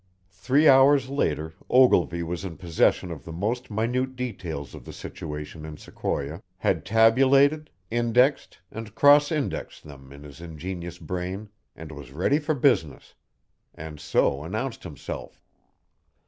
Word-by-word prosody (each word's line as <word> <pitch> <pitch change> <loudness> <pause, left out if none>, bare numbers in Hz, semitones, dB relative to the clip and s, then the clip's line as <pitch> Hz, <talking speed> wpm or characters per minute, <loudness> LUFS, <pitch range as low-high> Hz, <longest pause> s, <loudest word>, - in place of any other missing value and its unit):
Three 130 +11 +2
hours 135 0 +6
later 80 - -1 0.2
Ogilvy 90 -10 +4
was 85 +2 -4
in 90 -4 -6
possession 90 0 +1
of 80 - -8
the 80 - -9
most 110 +9 -3
minute 125 +5 -1
details 90 - -5
of - - -10
the - - -10
situation 75 +1 -7
in 80 -1 -8
Sequoia, 75 +5 -4 0.2
had 85 -5 0
tabulated, 135 +7 +4 0.2
indexed, 120 +4 +2
and 110 -1 -8
cross 145 +5 +6
indexed 150 -4 -3
them 70 -2 -13
in 70 +1 -12
his 75 +2 -12
ingenious 85 +1 -7
brain 90 +5 -5 0.3
and 80 -1 -10
was 70 -4 -10
ready 95 - +1
for 155 0 -1
business 120 - 0 0.6
and 75 -1 -9
so 70 -1 +1
announced 110 - -4
himself. 75 -7 -8
95 Hz, 135 wpm, -25 LUFS, 80-130 Hz, 0.6 s, hours